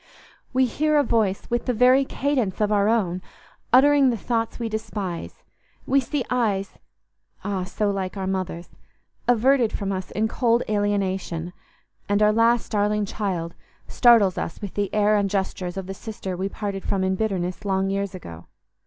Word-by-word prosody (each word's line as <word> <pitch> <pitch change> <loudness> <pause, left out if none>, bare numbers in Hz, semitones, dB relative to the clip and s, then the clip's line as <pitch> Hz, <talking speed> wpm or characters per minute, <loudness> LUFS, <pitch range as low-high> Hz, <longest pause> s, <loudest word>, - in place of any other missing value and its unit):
We 260 0 +3
hear 305 +5 +1
a 290 - +4
voice 215 -7 0
with 240 +2 -1
the 250 - +1
very 255 +4 +5
cadence 265 -9 -1
of 210 -1 +1
our 205 0 +3
own 185 -6 +1 0.5
uttering 275 +1 +6
the 235 - 0
thoughts 230 +1 -2
we 235 - -3
despise; 210 -5 -5 0.4
we 275 - +3
see 265 +1 -2
eyes—ah, 200 -3 -4
so 205 +2 -1
like 195 0 -4
our 190 - -3
mother's!—averted 215 +7 -1
from 200 -1 -3
us 185 -1 -4
in 220 +1 0
cold 235 +1 +1
alienation; 190 -5 -1 0.6
and 205 +1 +3
our 210 0 +4
last 230 +1 +2
darling 210 0 +1
child 185 -5 -3 0.3
startles 230 -7 +4
us - - -5
with 205 -3 -6
the 205 -2 -2
air 210 0 +3
and 200 -1 +1
gestures 190 -2 -2
of 190 - -4
the 195 - -5
sister 195 -2 -6
we 190 +2 -2
parted 200 -2 -4
from 190 -1 -1
in 190 0 +1
bitterness 190 -3 -2
long 195 -1 0
years 200 -1 -2
ago. 85 - -10
205 Hz, 160 wpm, -24 LUFS, 190-230 Hz, 0.6 s, uttering